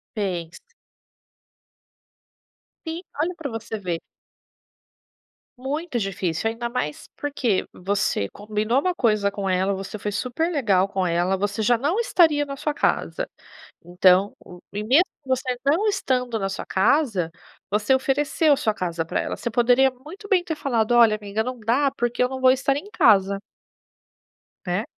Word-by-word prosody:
Fez. 175 -5 -3 2.3
Sim, 325 +2 -4 0.2
olha 350 +3 -1
pra 295 -5 -5
você 225 0 -5
ver. 175 -4 -2 1.6
Muito 280 +1 -3
difícil, 195 -1 -1
ainda 235 +1 -4
mais 150 -12 -4
porque 255 -9 -1
você 190 - -1
combinou 215 +4 -1
uma 365 +4 0
coisa 210 -7 +1
com 195 -1 -3
ela. 190 +2 +1
Você 195 +2 -6
foi 210 +1 -4
super 255 - -1
legal 200 - +2
com 190 -2 -1
ela, 175 +2 +1
você 205 +2 -2
já 240 +1 +3
não 320 - 0
estaria 320 -10 +3
na 275 -1 -6
sua 295 +2 -3
casa, - - 0 0.6
então 185 +2 +3 0.4
e 210 - -3
mesmo 275 - +5 0.2
você 260 -1 0
não 325 +10 +2
estando 250 - 0
na 195 -1 -1
sua 195 - -5
casa, 205 - +2 0.4
você 210 +6 +2
ofereceu 285 +3 +2
a - - +1
sua 215 -4 0
casa 170 -4 -3
pra - - -2
ela. - - -4
Você 235 - -4
poderia 245 +3 +4
muito 310 +12 -12
bem 375 -3 +3
ter 320 -3 -3
falado: 240 -5 0
"Olha, 230 -3 +6
amiga, 210 +1 -3
não 255 0 -5
dá 255 +6 +2
porque 240 +1 0
eu 250 - +1
não 260 0 -5
vou 260 - +6
estar 270 +1 +2
em 355 +9 -6
casa.". 195 -2 +4 1.3
Né? 180 +4 -1
235 Hz, 155 wpm, -23 LUFS, 195-275 Hz, 2.3 s, Olha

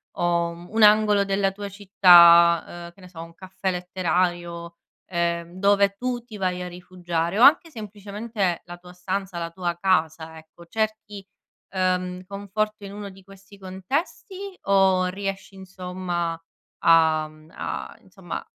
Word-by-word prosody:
o, 170 -1 0
uhm, 170 +1 -11
un 220 0 +1
angolo 210 -1 +5
della 195 0 0
tua 200 0 -7
città, 175 -3 +5
uhm, - - -17
che 195 - -24
ne 185 - -12
so, 170 -2 -10
un 165 0 -13
caffè 190 +1 -4
letterario, 175 -1 -2 0.3
ehm, 170 -1 -2
dove 200 0 +3
tu 245 0 -3
ti 220 -3 -11
vai 180 -2 -2
a 180 - -5
rifugiare, 175 0 -4
o - - +2
anche 325 +4 +6
semplicemente 210 - -4
la 175 0 -10
tua 180 0 -15
stanza, 185 +1 -4
la 170 0 -4
tua 175 0 -3
casa, 160 -3 0
ecco. 160 +2 -16
Cerchi, 215 -1 -4 0.5
uhm, 185 -1 -1
conforto 205 +1 -4
in 195 - -9
uno 205 -1 -7
di 190 0 -16
questi 195 +1 -17
contesti 300 - -5
o 190 -2 +3
riesci, 195 +1 -5
insomma, 180 -3 -5 0.5
a 160 -2 +4
mhmm, 155 0 -19
a - - -6
insomma - - -8
185 Hz, 150 wpm, -24 LUFS, 175-200 Hz, 0.5 s, anche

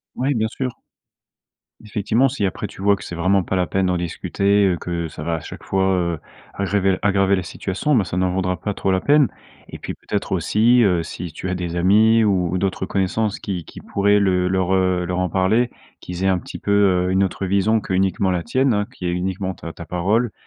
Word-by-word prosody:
Oui, 135 +3 0
bien 110 0 +1
sûr. 130 +1 -3 1.1
Effectivement, 110 +5 +1
si 125 -6 -2
après 95 +2 -3
tu 95 - -12
vois 100 0 +3
que - - -10
c'est 85 - -6
vraiment 95 +3 +2
pas 95 - -3
la 90 -1 +2
peine 95 +1 0
d'en 90 0 +1
discuter, 100 +4 +1
heu, 95 -2 +2
que 85 -1 -3
ça 75 0 -8
va 85 0 -1
à - - -3
chaque - - -10
fois, 95 0 0
heu, 85 -3 -1 0.3
aggraver- 95 -1 0
aggraver 100 -1 +3
la 90 - -2
situation, 95 - -1
ben, 110 - +3
ça 90 - -4
n'en 90 -1 +1
vaudra 90 -1 -1
pas 105 +1 -3
trop 95 - -1
la 95 - +2
peine 145 +1 +4 0.4
et - - -8
puis - - -5
peut-être - - -4
aussi, 120 +3 +3
heu, 90 -4 +2
si 85 +1 -7
tu 90 - -6
as 95 - -1
des 90 -1 -4
amis 110 +5 +4
ou 95 -3 +1
d'autres 95 0 -1
connaissances 100 +2 -1
qui 90 -4 -4
qui - - -12
pourraient 100 +1 +2
le 90 -2 +2
leur, 95 0 +1
heu, 95 -1 +1
leur 90 +1 -2
en 90 -1 0
parler. 100 +7 +2 0.3
Qu'ils 90 +1 -4
aient - - +4
un 95 -1 +3
petit - - -9
peu, 100 - -2
heu, 95 -3 +3
une 95 +1 +3
autre 95 +1 -2
vision 100 +4 +2
qu'uniquement 95 -1 0
la 90 -2 -1
tienne, 130 +3 +1
hein, 105 0 0
qui 90 - -8
est 85 - 0
uniquement 95 +1 -2
ta 85 -1 -8
ta 85 - -10
parole, 105 +7 0
95 Hz, 225 wpm, -21 LUFS, 90-105 Hz, 1.1 s, peine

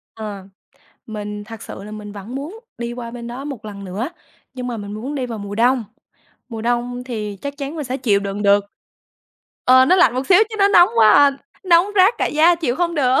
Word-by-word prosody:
Ờ, 210 -3 -7 0.6
mình 210 -1 -6
thật 225 0 -10
sự - - -9
là 210 - -9
mình 210 -1 -8
vẫn 205 +5 -9
muốn 305 +11 -6 0.2
đi 235 0 -4
qua 240 -1 -7
bên 235 0 -8
đó 245 +3 -7
một 270 -7 -7
lần 200 -2 -8
nữa, 200 +8 -4 0.5
nhưng 250 -1 -5
mà 240 -2 -3
mình 205 -1 -7
muốn 250 +8 -5
đi 260 -3 -2
vào 230 -2 -6
mùa 200 0 -6
đông, 245 +1 +2 0.6
mùa 225 -2 -6
đông 245 +1 -2
thì 215 -5 -5
chắc 280 0 -5
chắn 285 +2 -5
mình 300 - -4
sẽ 255 +1 -3
chịu 215 -7 +1
đựng 200 +1 -4
được. 200 0 +4 1.0
Ờ, 260 +1 +7
nó 365 - +4
lạnh 305 -10 +4
một 260 +1 -2
xíu 360 - +6
chứ 435 - -7
nó 395 0 +5
nóng 350 -3 +6
quá 220 -2 +7
à, 285 +5 +6 0.3
nóng 345 0 +5
rát 385 +5 +5
cả - - +1
da 325 +3 +4
chịu 295 -7 -2
không 345 -1 0
được. 265 -3 +3
245 Hz, 225 wpm, -20 LUFS, 210-280 Hz, 1.0 s, Ờ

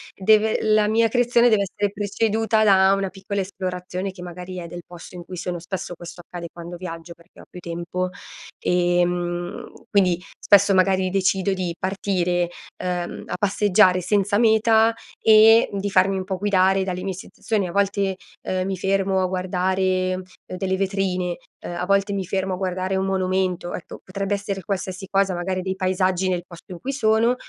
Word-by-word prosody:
Deve 215 +2 +3
la 215 -1 +3
mia 225 +1 +3
creazione 245 0 +3
deve 215 -3 +3
essere 200 +1 -2
preceduta 215 +2 0
da 195 -2 +5
una 195 -1 -1
piccola 195 +1 -4
esplorazione, 185 0 -4
che 185 -1 -12
magari 180 +1 -8
è 175 -1 -6
del 175 +1 -8
posto 175 +1 -12
in 175 - -9
cui 185 - -8
sono, 175 0 -4
spesso 180 +1 -5
questo 175 +1 -10
accade 175 0 -8
quando 175 0 -8
viaggio 170 -1 -7
perché 170 +1 -19
ho - - -15
più 180 - -10
tempo, 175 +2 -3 0.5
ehm, 175 0 0 0.2
quindi, 185 -4 +3 0.2
spesso 200 0 +5
magari 190 0 +3
decido 195 +1 +1
di 180 -3 -3
partire, 180 -2 0 0.3
ehm, 180 -1 -3
a - - -4
passeggiare 200 -1 +3
senza 200 +2 +1
meta 225 0 +4 0.3
e 220 +1 +7
di 200 0 -2
farmi 195 0 +3
un 190 - -2
po' 190 0 -3
guidare 190 -1 +2
dalle 185 -1 -3
mie 190 0 -2
sensazioni. 195 +2 -3
A - - -6
volte, 200 0 +1 0.3
ehm, 185 0 -2
mi 190 0 -2
fermo 195 0 +1
a - - +2
guardare 185 0 0 0.2
delle 190 0 -2
vetrine, 185 -2 -1 0.2
ehm, 175 - -7
a 175 +1 -2
volte 200 +1 +2
mi 195 -1 -2
fermo 190 +1 -1
a - - -3
guardare 185 0 -2
un 190 0 0
monumento. 185 -2 -1
Ecco, 180 - -9
potrebbe 195 +1 -3
essere 200 -1 -3
qualsiasi 190 0 -4
cosa, 195 0 +1
magari 185 +1 -2
dei 190 +1 -3
paesaggi 185 0 0
nel 180 -1 0
posto 170 +2 -14
in 175 - -7
cui 275 +7 -4
sono, 225 -1 +2
190 Hz, 175 wpm, -23 LUFS, 180-200 Hz, 0.5 s, e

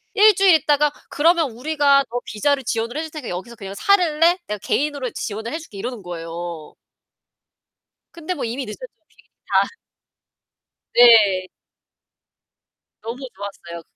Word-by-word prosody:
1 425 -1 +6
주일 385 -3 +5
있다가 295 -1 +2 0.2
"그러면 325 -3 +2
우리가 280 +1 +2
너 245 - -2
비자를 270 +6 0
지원을 230 +2 -2
해 315 - -2
줄 320 - -8
테니까 300 -5 -7
여기서 190 +7 -6
그냥 195 -2 -8
살래? 345 - +3
내가 210 - -3
개인으로 285 -4 -1
지원을 220 +5 -5
해 325 - -3
줄게." 260 -11 -12
이러는 235 +2 -5
거예요. 170 -1 -7 1.4
근데 340 +2 -4
뭐 290 - -4
이미 240 +4 -3
늦었죠. 355 - -8 0.2
비행기 - - -26 0.3
다 - - +6 1.3
네. 210 -6 +6 1.5
너무 230 +3 -6 0.2
좋았어요. 175 -4 -8
250 Hz, 290 characters per minute, -21 LUFS, 205-310 Hz, 1.5 s, 1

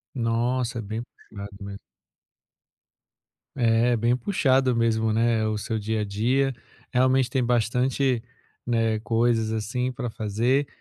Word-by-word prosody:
Nossa, 120 +1 0
é - - -3
bem 110 +2 -4 0.3
puxado 100 -1 -8
mesmo. 100 0 -7 1.8
É, 120 -1 +3
bem 120 +2 +2
puxado 130 - +2
mesmo, 110 -1 +1
né, 115 0 +2
o 110 -1 -1
seu 110 +2 -3
dia 110 +1 -2
a - - -1
dia. 125 +7 +1 0.4
Realmente 130 0 +3
tem 130 0 0
bastante, 125 +1 +1 0.4
né, 115 -2 +1
coisas 115 -1 +1
assim 115 +4 -2
para 125 -2 -4
fazer. 115 +7 0
115 Hz, 130 wpm, -25 LUFS, 110-125 Hz, 1.8 s, É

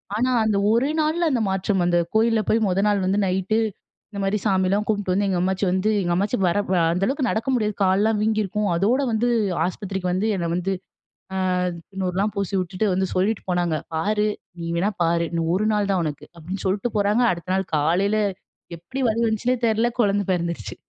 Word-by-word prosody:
ஆனா 250 +4 +1
அந்த 215 -2 +1
ஒரே 255 +6 +2
நாள்ல 325 +2 +1
அந்த 240 -3 +1
மாற்றம் 190 0 0
வந்து 175 0 +2 0.2
கோயில்ல 225 0 +3
போய் 225 - +3
முத 190 +1 +1
நாள் 200 -2 +1
வந்து 195 +2 +1
நைட்டு 190 +3 0 0.5
இந்த 200 - -6
மாரி 195 +2 +1
சாமியெல்லாம் 195 +1 +2
கும்ட்டு 205 -3 0
வந்து 200 +2 +1
எங்க 185 -2 0
அம்மாச்சி 190 +1 0
வந்து 190 +3 +1
எங்க 175 -1 -1
அம்மாச்சி 200 +6 0
வர 175 - +1 0.4
அந்த 180 +2 -1
அளவுக்கு 270 -2 0
நடக்க 225 +5 -1
முடியாது. 215 -3 0
காலலாம் 205 +3 +2
வீங்கியிருக்கும் 210 -2 0
அதோடு 235 +10 +2
வந்து 225 +2 +1 0.4
ஆஸ்பத்திரிக்கு 185 -1 -3
வந்து 200 +4 0
என்ன 170 -1 -2
வந்து 180 +2 -1 0.6
ஆ - - -2 0.5
திந்நூறுலாம் 195 +1 -1
பூசி 200 -1 -3
விட்டுட்டு 185 +4 -2
வந்து 190 +1 +1
சொல்லிட்டு 200 +4 +1
போனாங்க. 175 -3 +1 0.2
"பார் 210 +6 0 0.4
நீ 165 - -5
வேணா 190 +5 +1
பாரு 170 0 +2
இன்னும் 165 -1 -2
ஒரு 205 +3 +1
நாள் 205 -1 +1
தான் 185 -3 +1
உனக்கு." 150 -2 -5
அப்டின்னு 175 +4 -6
சொல்லிட்டு 200 +5 0
போறாங்க 205 +4 +2
அடுத்த 170 +1 -6
நாள் 190 -1 0
காலயில 180 +8 +2 0.6
எப்படி 255 +11 -8
வலி 225 +1 0
வந்துச்சுன்னே 230 +3 +1
தெரியல 225 +1 +2
குழந்தை 205 -2 +2
பிறந்துடுச்சு. 170 -1 -3
200 Hz, 185 wpm, -23 LUFS, 185-215 Hz, 0.6 s, கோயில்ல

